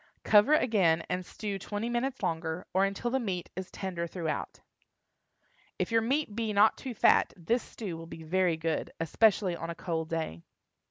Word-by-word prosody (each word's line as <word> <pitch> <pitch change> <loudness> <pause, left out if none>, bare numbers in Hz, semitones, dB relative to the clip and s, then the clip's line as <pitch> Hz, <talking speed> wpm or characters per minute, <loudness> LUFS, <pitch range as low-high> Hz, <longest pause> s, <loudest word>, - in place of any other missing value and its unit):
Cover 215 +8 +6
again, 185 - +3
and 180 0 -1
stew 200 +1 -5
twenty 205 +4 -3
minutes 240 0 -2
longer, 160 -1 -2
or 190 +1 +4
until 200 +5 -2
the 265 - +2
meat 190 -7 -3
is 185 0 -5
tender 175 -3 -4
throughout. 165 -3 -4 1.2
If - - -2
your 225 0 +4
meat 260 -1 0
be 225 -2 -1
not 205 +2 +5
too 255 -3 -6
fat, - - +4
this 225 +8 0
stew 195 -8 -6
will 165 0 -9
be 165 -1 -9
very 175 0 +1
good, 160 -1 -2
especially 190 +2 +3
on 165 0 -6
a 170 - -4
cold 165 -2 -3
day. 160 - -3
190 Hz, 175 wpm, -30 LUFS, 165-220 Hz, 1.2 s, Cover